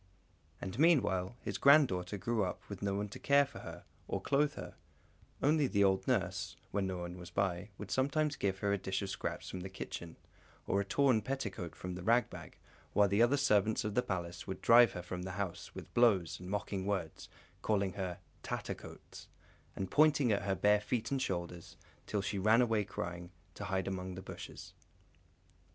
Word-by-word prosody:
And, 95 +6 -6
meanwhile, 120 - +3
his - - -4
granddaughter 110 -10 +5
grew 110 +2 0
up 90 - -4
with 100 -2 -7
no 100 -1 0
one 105 +1 -2
to - - -9
care 140 0 +4
for 135 -3 -11
her, - - -9 0.2
or - - -2
clothe 145 +1 +1
her; - - -7 0.7
only 150 0 +4
the 100 -4 +2
old 95 -1 +2
nurse, 95 -8 0 0.2
when 100 -1 0
no 95 -1 -3
one 90 0 -6
was 90 0 -9
by, 95 +1 -1
would 105 - -8
sometimes 145 +3 +1
give 95 -1 -1
her 100 - +3
a 100 - 0
dish 95 +2 -2
of 95 - -4
scraps - - -4
from 95 - -5
the 95 +2 -6
kitchen, 85 -3 -7 0.5
or 100 - +1
a - - -3
torn 130 +1 +3
petticoat 105 -8 -4
from 90 0 -6
the 90 - -6
rag 115 +6 +3
bag; - - -10 0.4
while 100 -1 +5
the 100 +3 +2
other 120 +4 +4
servants 110 -5 +2
of 105 -1 -2
the 125 - +3
Palace 85 -5 -4
would 95 -1 -4
drive 120 -2 +7
her 90 - -5
from 90 0 -5
the 95 0 -5
house 95 -3 -5
with - - -9
blows 100 -9 +3
and 90 0 -8
mocking 100 -1 -2
words, 95 -6 -3 0.3
calling 100 -3 +1
her 95 -3 -4 0.2
"Tattercoats," - - -7 0.5
and 95 -2 -4
pointing 145 -5 +4
at 100 - +2
her 95 -1 0
bare 105 +1 +4
feet 110 +4 -2
and 135 -1 0
shoulders, 85 -4 -4 0.3
till 105 - -1
she 100 0 -2
ran 110 +5 +5
away 110 -3 +1
crying, 90 -2 -5 0.2
to - - -6
hide 95 0 -1
among 95 -1 -4
the 95 - -8
bushes. - - -9
100 Hz, 195 wpm, -34 LUFS, 95-120 Hz, 0.7 s, drive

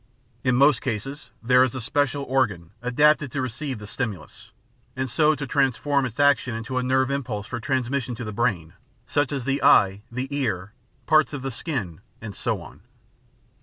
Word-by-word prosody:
In 130 -1 +2
most 140 -1 +5
cases 135 +4 -4
there 125 +2 +5
is 130 -1 -1
a - - -3
special 140 +3 0
organ 110 -11 0
adapted 145 +3 +3
to 145 - -2
receive 130 +2 -4
the 105 - -9
stimulus, 105 - -6 0.4
and 130 0 -2
so 150 +4 +3
to 145 0 -5
transform 135 +1 +1
its 115 +1 -11
action 140 -4 +3
into 115 +3 -3
a - - -2
nerve 130 +1 +2
impulse 120 -7 -3
for 120 - -5
transmission 130 0 -1
to 120 - -6
the 110 -1 -5
brain, 100 -8 -1 0.3
such 145 0 0
as 135 -4 -3
the 140 0 0
eye, 100 +1 +5
the 130 +3 -3
ear, 110 -7 -2 0.3
parts 155 -1 +4
of 140 -3 -5
the 135 - -3
skin, 115 - -4 0.2
and 110 -2 -7
so - - -2
on. - - -14
130 Hz, 180 wpm, -24 LUFS, 115-140 Hz, 0.4 s, most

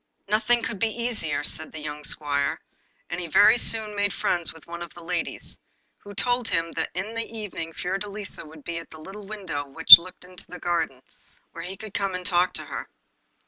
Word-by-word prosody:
'Nothing 230 +3 +2
could 225 -4 -4
be 225 +2 -1
easier,' 215 -12 0
said - - -3
the 160 - -8
young 150 0 -7
squire; 140 -2 -2 0.5
and 180 - -3
he 170 - -5
very 205 +7 +6
soon 220 -3 +4
made 205 0 0
friends 170 -2 -1
with 160 - -16
one 170 0 -8
of 170 -2 -7
the 175 - -12
ladies, 170 0 -3 0.4
who 205 0 -12
told 245 +1 +1
him 165 0 -1
that 160 - -3
in 195 +5 -4
the 230 0 -4
evening 195 -6 -6
Fiordelisa 195 +4 -5
would 155 -1 -14
be 170 -1 -4
at 165 - -13
a - - -12
little 195 +5 -10
window 195 -9 -5
which 160 +5 +11
looked 180 +1 -13
into 180 -1 -12
the 180 - -8
garden, 160 -7 -2 0.5
where 170 +1 -8
he 190 +2 -7
could 215 0 -10
come 195 -2 -1
and 180 0 -6
talk 180 -1 +2
to - - -6
her. - - -7
180 Hz, 205 wpm, -25 LUFS, 165-210 Hz, 0.5 s, which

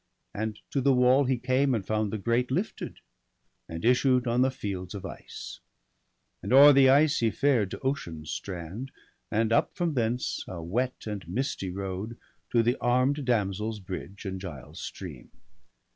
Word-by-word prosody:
And 110 0 -3
to 140 - 0
the 135 0 +4
wall 125 +3 +5
he 130 0 +1
came, 130 +2 +2
and 100 -4 -3
found 110 -1 0
the 110 - -2
grate 120 +5 0
Lifted, - - -3 0.7
and 80 +5 -5
issued 125 +1 +4
on 120 +1 +2
the 130 - +4
fields 95 -7 -5
of 100 - -6
ice. - - -8 0.8
And 100 - -5
o'er 140 +3 +9
the 135 -1 +6
ice 145 +2 +5
he 115 - +3
fared 120 -5 +2
to - - -6
Ocean's 85 - -3
strand. 95 +7 -5 0.4
And 115 +1 +1
up - - +2
from 175 -3 0
thence, 120 -1 -1
a 90 - -6
wet 125 +9 -2
and 105 -5 -5
misty 120 - -2
road, 95 +4 -5 0.3
To 115 -1 +3
the 120 +2 +1
arm'd 130 +4 +1
damsel's 105 -2 0
bridge, 95 +1 -7
and 95 -1 -4
Giall's 75 -5 -8
stream. - - -8
115 Hz, 165 wpm, -28 LUFS, 95-130 Hz, 0.8 s, o'er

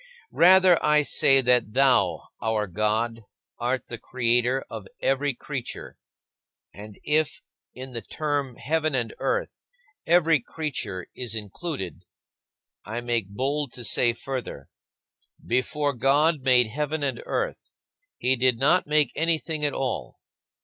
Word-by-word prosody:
Rather, 185 0 +6
I 150 0 +4
say 135 -1 +4
that 125 -4 +2
thou, 130 -2 +2
our 110 -2 0
God, 110 +4 -1 0.4
art 125 +1 -1
the 120 - -7
Creator 125 +1 0
of 110 -4 -8
every 135 0 0
creature. 130 -1 -7 0.8
And 105 0 -11
if 155 0 0 0.3
in 130 +1 -8
the 115 -2 -5
term 145 0 -3
"heaven 155 +4 -1
and 120 -3 -2
earth" - - -1 0.6
every 165 -2 +4
creature 120 - -5
is 120 -3 -4
included, 105 - -6 0.8
I 115 +3 -5
make 120 -5 -1
bold 135 +5 -2
to 125 - -7
say 120 +2 +3
further: 120 - -6 0.8
"Before 140 +4 0
God 145 +5 +2
made 125 -2 +4
heaven 150 +6 -3
and 130 -4 -2
earth, - - -3 0.5
he 130 +1 +2
did 130 -1 +2
not 150 +8 +3
make 150 -3 +2
anything 160 -1 -1
at 145 - +1
all. 130 -2 -3
130 Hz, 130 wpm, -25 LUFS, 115-150 Hz, 0.8 s, Rather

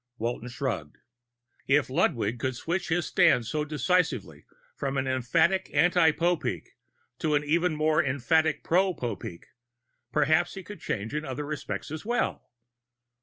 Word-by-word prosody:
Walton 120 +1 -3
shrugged. 120 - -4 0.7
If 145 +1 +3
Ludwig 120 -4 0
could 130 +2 -1
switch 170 +9 -2
his 165 0 +1
stand 120 - +4
so 150 +7 -1
decisively 155 +4 0 0.3
from 135 0 -2
an 135 - 0
emphatic 130 +8 +1
anti 165 +2 +5
Popeek 170 +2 -1 0.5
to 155 -2 +1
an 145 - +1
even 165 +2 +1
more 155 +2 +2
emphatic 155 +4 +1
pro 185 +1 +2
Popeek, 100 -7 -5 0.7
perhaps 155 +5 +2
he 190 - -7
could 205 +1 -10
change 110 +4 -3
in 150 +1 -2
other 145 0 -4
respects 145 -1 -5
as 155 0 -5
well. 240 +3 -1
150 Hz, 140 wpm, -27 LUFS, 130-170 Hz, 0.7 s, anti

